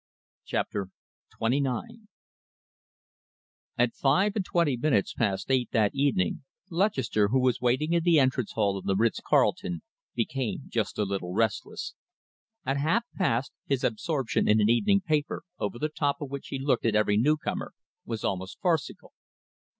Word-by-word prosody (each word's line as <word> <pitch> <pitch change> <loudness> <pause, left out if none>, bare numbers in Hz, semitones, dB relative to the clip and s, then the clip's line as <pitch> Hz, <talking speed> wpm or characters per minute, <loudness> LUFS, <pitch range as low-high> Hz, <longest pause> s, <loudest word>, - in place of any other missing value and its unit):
CHAPTER 100 -2 -2 0.5
XXIX 140 - -1 1.7
At 120 -1 +2
five 190 +10 +2
and 205 - 0
twenty 170 -6 +1
minutes 120 -5 +1
past 100 +1 -1
eight 130 -2 +2
that 110 -4 +3
evening 135 -8 +1 0.3
Lutchester, 135 - +1
who 130 +6 +2
was 125 -2 +1
waiting 130 +7 +1
in 170 - +3
the 165 -2 +5
entrance 130 -4 +1
hall 100 -3 +1
of - - -12
the 95 - +1
Ritz 115 +3 +1
Carlton, 85 -2 +1 0.3
became 125 +2 -2
just 110 -3 -2
a 105 - +2
little 95 -2 -3
restless. 110 -1 -1 0.7
At 135 +2 0
half 165 +11 +2
past, 135 -9 0 0.2
his 135 -2 0
absorption 130 +2 0
in 105 +1 +5
an 105 +1 +4
evening 200 - +3
paper, 155 -5 -1 0.2
over 105 +2 -2
the 150 - 0
top 145 -2 -1
of 145 -2 -6
which 140 -1 -6
he 135 - -4
looked 135 -3 +1
at 110 - +1
every 105 -1 +3
newcomer, 150 +7 0 0.3
was 115 -2 -5
almost 95 0 -3
farcical. 170 -5 -1
130 Hz, 150 wpm, -28 LUFS, 110-150 Hz, 1.7 s, the